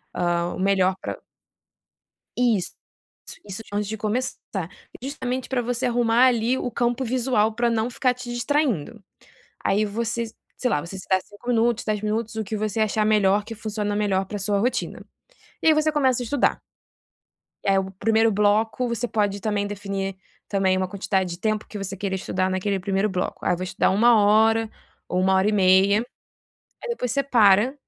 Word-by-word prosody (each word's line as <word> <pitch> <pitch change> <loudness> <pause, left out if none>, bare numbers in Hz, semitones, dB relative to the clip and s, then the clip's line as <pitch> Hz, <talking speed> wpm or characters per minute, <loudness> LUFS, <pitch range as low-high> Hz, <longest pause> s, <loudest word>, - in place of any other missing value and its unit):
hã, 175 0 0
o - - -8
melhor 190 -1 +2
pra - - -5 1.2
Isso. 230 -7 +1 0.8
Isso 200 +3 -7
antes 205 -1 -1
de 220 - -4
começar, 220 +5 -2 0.6
justamente 260 -2 -4
para 260 -2 0
você 245 +1 -1
arrumar 240 0 +3
ali 240 +1 +1
o - - -2
campo 240 +2 0
visual 235 -3 +1
para 240 +1 +1
não 225 +1 0
ficar 250 0 +1
te 250 -1 -8
distraindo. 240 - -1 0.6
Aí 210 +2 +2
você, 230 +2 -2 0.3
sei 250 - 0
lá 145 - +1
você 190 +3 -8
se - - -10
dá 190 - +5
5 205 +4 -14
minutos 235 0 +2
10 215 -1 -1
minutos 220 +1 -2
o 220 - -2
que 210 +2 -5
você 215 +1 -2
achar 215 0 +1
melhor 205 -1 +3
que 225 +1 -7
funciona 210 -1 -3
melhor 195 -2 0
para 205 +2 -5
sua 200 +1 0
rotina. 245 +5 -2 0.6
E - - +3
aí 315 - +7
você 310 0 +2
começa 260 -5 +2
a - - -6
estudar. 265 +3 +1 1.0
Eh, 195 -1 +3
o 190 0 -4
1º 220 +3 +2
bloco 215 +4 +1
você 235 +1 -2
pode 205 -3 0
também 205 -1 -1
definir 195 -1 -4 0.3
também 190 -2 +1
uma 185 0 0
quantidade 190 -1 -1
de 175 - -7
tempo 215 0 -1
que 210 - -8
você 195 0 -5
queira 190 0 -2
estudar 185 0 -1
naquele 190 +1 -1
1º 195 +2 0
bloco. 180 -1 -3
Aí - - +3
eu - - -2
vou 185 - -4
estudar 185 - +1
1 230 +4 +5
hora, 220 +2 +4 0.4
ou 180 - -1
1h30, 190 +1 +4 0.8
aí - - -6
depois 250 - -2
você 280 - +1
para, 230 -1 +4
215 Hz, 175 wpm, -24 LUFS, 195-240 Hz, 1.2 s, aí